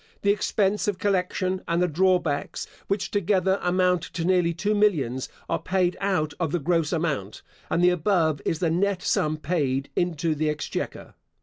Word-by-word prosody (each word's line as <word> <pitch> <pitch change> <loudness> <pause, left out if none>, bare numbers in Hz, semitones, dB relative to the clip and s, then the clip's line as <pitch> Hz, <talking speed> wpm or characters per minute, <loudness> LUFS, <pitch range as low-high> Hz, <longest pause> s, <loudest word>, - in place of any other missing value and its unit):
(The 200 - +4
expense 205 -1 0
of 205 -3 0
collection 185 -1 0
and 170 +1 +1
the 180 - +3
drawbacks, 175 -3 0 0.2
which 200 0 -1
together 190 -1 +1
amount 180 -1 +2
to 170 0 -5
nearly 180 -2 +3
two 195 +6 -1
millions, 150 - +1 0.2
are - - -1
paid 185 -1 +1
out 170 -7 0
of 165 -4 -1
the 175 - +1
gross 165 0 0
amount; 150 - -2 0.3
and 175 - +1
the 180 - +6
above 165 -4 +1
is 165 - 0
the 165 0 0
net 185 +2 0
sum 155 0 +1
paid 140 -5 -1
into 165 -2 0
the 155 0 0
exchequer). 150 -1 -4
175 Hz, 170 wpm, -25 LUFS, 155-190 Hz, 0.3 s, the